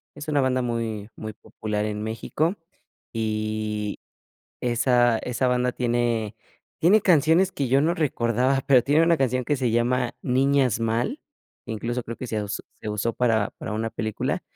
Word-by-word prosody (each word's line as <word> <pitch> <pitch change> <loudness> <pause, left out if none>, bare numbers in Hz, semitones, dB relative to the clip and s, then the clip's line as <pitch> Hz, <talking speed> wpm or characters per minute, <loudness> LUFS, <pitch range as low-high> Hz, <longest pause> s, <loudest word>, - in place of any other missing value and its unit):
Es 145 +1 -8
una 145 -2 +2
banda 130 -1 +1
muy 115 -3 -3
muy 110 0 -6
popular 105 0 -4
en 105 0 -3
México, 145 - -1 0.6
y 110 -1 -2 0.6
esa 120 -1 +3
esa 125 +2 -1
banda 125 0 +1
tiene 120 -3 0 0.5
tiene 185 +6 +5
canciones 175 +1 +4
que 140 -7 -2
yo 135 +3 +4
no 165 +4 +2
recordaba, 130 -3 +1
pero 130 -3 +6
tiene 145 +5 +3
una 170 0 +4
canción 130 -2 0
que 145 - +1
se 125 -3 0
llama 120 +2 +1
Niñas 130 -2 +2
Mal, 115 - -1 0.5
incluso, 115 +2 -3
creo 115 0 -7
que 130 - -6
se 110 -2 -2
aus 105 -1 -4
se - - -8
usó 105 +2 -1
para 110 -4 +1
para 110 - -5
una 115 +1 -2
película. 110 -1 -2
120 Hz, 160 wpm, -25 LUFS, 110-135 Hz, 0.6 s, pero